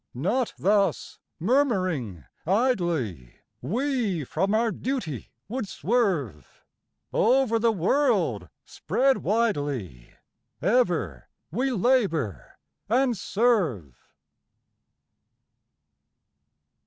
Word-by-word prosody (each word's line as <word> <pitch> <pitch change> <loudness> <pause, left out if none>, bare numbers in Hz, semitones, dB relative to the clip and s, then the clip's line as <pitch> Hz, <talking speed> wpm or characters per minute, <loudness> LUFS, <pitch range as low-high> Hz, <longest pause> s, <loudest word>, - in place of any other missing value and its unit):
Not 210 - -1
thus, 200 +1 +1 0.2
murmuring 185 - 0 0.2
idly, 175 - 0 0.3
we 220 - -1
from 190 - 0
our 225 0 +2
duty 215 - -4 0.2
would 245 -2 -4
swerve, 180 - -2 0.5
Over 235 -1 +3
the 230 0 +3
world 225 - +1 0.2
spread 270 +1 +1
widely 145 - -2 0.4
ever 170 - 0 0.2
we 255 - 0
labour 195 - 0 0.3
and 250 +1 +2
serve. 185 - 0
200 Hz, 70 wpm, -26 LUFS, -, 0.5 s, Over